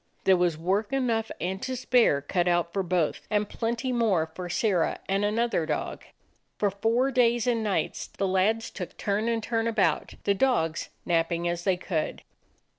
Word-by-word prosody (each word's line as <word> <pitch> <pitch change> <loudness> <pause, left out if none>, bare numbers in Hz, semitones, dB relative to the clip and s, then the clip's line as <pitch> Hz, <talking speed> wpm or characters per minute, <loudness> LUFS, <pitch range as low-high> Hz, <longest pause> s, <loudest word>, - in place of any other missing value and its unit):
There 190 - +5
was 175 -3 +1
work 195 +6 0
enough 235 -5 0
and 190 +3 -3
to 255 0 -3
spare 245 - +3
cut 175 +4 0
out 175 -1 +1
for 195 - 0
both, 180 -4 -1
and 210 -1 +1
plenty 235 +4 -2
more 200 -10 +1
for 180 +1 -6
Sirrah 180 -2 +1
and 195 +1 +1
an 210 +2 0
other 230 -9 +1
dog. 150 - -3 0.5
For 205 -1 +1
four 230 +7 +1
days 240 -2 +3
and 235 -3 +1
nights 205 -3 -1
the 195 - -2
lads 205 +5 +1
took 180 - -7
turn 205 +2 -1
and 230 -1 -1
turn 230 0 0
about, 190 -9 +1
the 200 - +3
dogs 190 -8 +1 0.2
napping 170 0 +1
as 175 0 -2
they 190 -2 +2
could. 170 -3 -3
200 Hz, 180 wpm, -27 LUFS, 175-230 Hz, 0.5 s, There